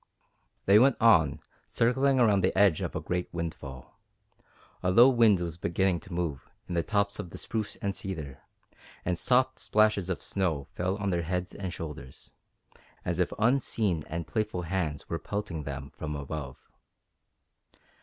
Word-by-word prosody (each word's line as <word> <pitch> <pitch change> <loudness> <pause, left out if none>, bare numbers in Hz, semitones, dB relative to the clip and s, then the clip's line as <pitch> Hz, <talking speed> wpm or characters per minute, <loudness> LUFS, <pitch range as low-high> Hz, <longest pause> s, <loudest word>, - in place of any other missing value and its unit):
They 100 +2 +7
went 130 +2 +4
on, 85 -11 +4 0.3
circling 135 +3 +2
around 105 -5 +4
the 95 - +1
edge 95 -5 +4
of - - -4
a - - 0
great 90 0 -3
windfall. 65 -6 -7 0.8
A 90 - +1
low 115 +7 +8
wind 115 -6 +5
was 85 -2 -4
beginning 90 +1 +1
to 95 - -13
move 85 -6 -3 0.2
in - - -5
the 85 - +2
tops 100 +5 0
of 95 -4 -5
the - - -9
spruce 110 -2 -3
and 100 -1 -1
cedar, 80 -8 -5 0.6
and 90 - +1
soft 130 +7 +2
splashes 105 -3 +2
of 95 - -3
snow 85 -8 -1
fell 95 +2 -1
on 100 -1 -1
their 85 -1 0
heads 90 +2 -3
and 95 -3 -5
shoulders, 75 -6 -9 0.7
as 85 0 -1
if 90 - +1
unseen 110 - +1
and 85 +1 -4
playful 105 -4 -2
hands 80 -4 -2
were 85 - -3
pelting 100 -7 -4
them 70 -1 -6
from 75 -1 -4
above. 70 -1 -5
90 Hz, 160 wpm, -29 LUFS, 80-105 Hz, 0.8 s, low